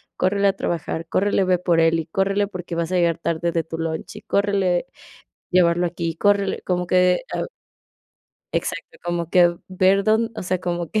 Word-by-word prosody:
córrele 200 +2 +2
a 195 - +3
trabajar, 165 -3 -3
córrele 200 0 +2
ve 185 -1 +2
por 170 -2 +2
él, 165 0 +3
y 160 - -4
córrele 195 +4 0
porque 180 -3 -6
vas 165 -1 -1
a - - +2
llegar 170 -2 +2
tarde 170 0 -1
de 165 -1 0
tu 160 - -6
lunch, 160 -1 -4
y - - -9
córrele 200 -1 +1 0.6
llevarlo 175 -1 +3
aquí, 170 -1 -3
córrele", 200 +1 +1
como 180 -1 -1
que, 180 0 +3
ah. - - -1 1.1
Exacto, - - -3
como 175 -1 -2
que 175 -1 +4
ver 190 +1 +3
dónde, 220 +1 +2
o - - -5
sea, 185 0 -1
como 175 -2 -3
que 215 - +1
180 Hz, 185 wpm, -22 LUFS, 170-195 Hz, 1.1 s, que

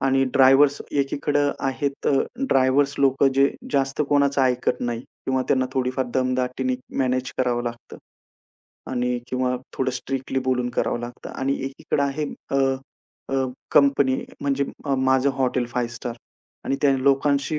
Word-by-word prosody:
आणि 135 0 +2
ड्रायव्हर्स 135 +2 +5
एकीकडं 145 +1 +1 0.2
आहेत 140 +1 -3
अ, - - +3 0.3
ड्रायव्हर्स 140 - +2
लोक 135 0 +3
जे 140 +1 +5 0.2
जास्त 135 +1 +1
कोणाचं 140 -1 +3
ऐकत 125 -1 +1
नाही 120 -1 -2
किंवा 130 +1 -3
त्यांना 130 -1 +2
थोडीफार 130 -1 -1
दमदाटीने 130 0 0 0.2
मॅनेज 130 -1 0
करावं 120 -2 +1
लागतं 120 -1 -7 0.9
आणि 125 -1 0
किंवा 125 0 0 0.2
थोडं 130 -1 0
स्ट्रिक्टली 130 +1 -3
बोलून 125 -1 0
करावं 120 - -1
लागतं 120 0 -8
आणि 135 +1 -1
एकीकडे 135 +1 -2
आहे 140 +2 -1 0.3
अ, 135 - +1 0.8
अ, 135 -1 +2 0.3
कंपनी 140 -2 +4
अ, - - -14
म्हणजे 140 0 0 0.3
माझं 130 +1 +3
हॉटेल 125 -2 +1
5 120 0 -2
स्टार 120 -1 -5 0.5
आणि 135 - 0
त्या 140 -1 +5
लोकांशी 140 +3 +2
130 Hz, 140 wpm, -23 LUFS, 125-140 Hz, 0.9 s, ड्रायव्हर्स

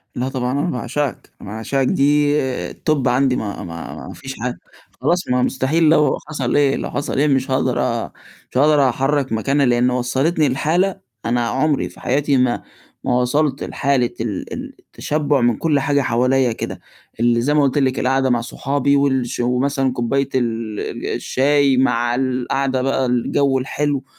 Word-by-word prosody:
لأ، 125 +2 -2
طبعًا 125 -2 -2
أنا 175 - 0
باعشقك، 130 0 -3
أنا - - -9
باعشقك 120 +5 -1
دي 145 +1 +3 0.4
الTop 150 -4 0
عندي 125 +1 +2
ما 100 -2 -4
ما 85 -1 -8
ما - - -8
فيش 135 0 -8
حاجة، 125 0 -3 0.4
خلاص 175 +1 +1
ما 125 0 +2
مستحيل 135 +6 +1
لو 150 -4 +3
حصل 140 -5 -2
إيه، 140 -2 +3
لو - - -4
حصل 140 -1 -3
إيه 150 - +3
مش 135 -2 +1
هاقدر 130 -1 +1
أ 115 -1 -2 0.4
مش - - -3
هاقدر 145 -1 +4
أحرّك 135 +1 0
مكانها 135 +5 +1
لإن 120 0 +3
وصّلتني 135 +5 +1
لحالة 170 +8 0 0.3
أنا 120 0 +1
عُمري 145 +3 0
فحياتي 140 +1 0
ما 125 -1 +1 0.4
ما 125 - +1
وصلت 140 +2 0
لحالة 135 -4 0
ال 110 -5 -4
ال - - -7
التشبُع 145 -2 -1
من 120 -2 +2
كلّ 150 -4 +1
حاجة 140 +1 +1
حواليّا 125 +1 +2
كده، 110 - -5 0.4
اللي 120 0 +3
زي 145 +5 +1
ما 150 - +4
قُلت 140 +1 +1
لِك 130 -2 +1
القعدة 135 0 +1
مع 120 -1 +2
صحابي 140 +3 0
وال 135 -3 +2
ش - - -5
ومثلًا 130 +2 0
كوباية 135 +3 0
ال 115 -4 -2
ال - - -5
الشاي 140 0 +2
مع 120 -2 +2
القعدة 130 +1 -1
بقى 135 0 0
الجو 130 +2 +1
الحلو، 140 +1 -2
135 Hz, 170 wpm, -19 LUFS, 125-140 Hz, 0.4 s, هاقدر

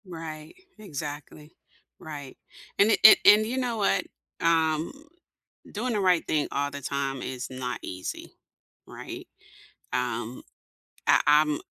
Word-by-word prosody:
Right. 160 -3 -8 0.2
Exactly. 150 -4 -8 0.4
Right. 145 -4 -9 0.4
And 205 +3 +5
a - - +4
and 220 - +11
and 210 +1 +7
you 245 +4 -3
know 245 -3 -1
what? 195 -2 +1 0.4
Um, 160 -2 +2 0.8
doing 235 +4 -2
the 210 - 0
right 180 -3 +3
thing 150 -2 0
all 145 0 -1
the 140 0 -7
time 135 -1 -3
is 130 -1 -5
not 130 -1 -5
easy, 90 0 -7 0.5
right? - - -9 0.7
Um, 120 -1 -3 0.6
I, - - +5 0.2
um 150 -1 -1
155 Hz, 130 wpm, -26 LUFS, 135-190 Hz, 0.8 s, and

